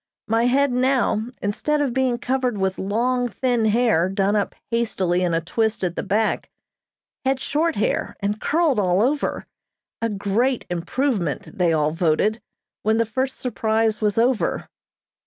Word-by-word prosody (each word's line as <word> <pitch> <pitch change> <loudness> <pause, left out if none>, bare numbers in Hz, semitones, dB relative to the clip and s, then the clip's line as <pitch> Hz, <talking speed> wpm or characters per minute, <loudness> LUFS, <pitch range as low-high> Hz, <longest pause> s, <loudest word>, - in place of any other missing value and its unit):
My 225 +2 +2
head 275 +2 +3
now, 250 -3 +1 0.2
instead 295 +9 0
of 280 -4 0
being 260 -2 +1
covered 250 -2 -1
with 190 -1 -1
long, 245 +5 0
thin 240 0 0
hair, 215 -6 +3
done 195 +1 +1
up 205 - -1 0.2
hastily 190 -6 0
in 175 -2 +1
a 165 - +1
twist 220 +5 -1
at 175 -1 -1
the - - -2
back, 210 +3 0 0.7
had 265 0 +1
short 315 +4 0
hair 205 - -1
and 205 +2 -2
curled 310 -6 +2
all 185 +1 +2
over, 285 +4 -1 0.6
a 230 - 0
great 210 +5 0
improvement, 175 - -2
they 175 -3 +2
all 155 -1 +2
voted, 175 +7 +1 0.4
when 220 +1 +2
the 230 - +2
first 260 +4 -2
surprise 220 -2 0
was 210 -1 +1
over. 240 0 +1
220 Hz, 155 wpm, -22 LUFS, 195-255 Hz, 0.7 s, head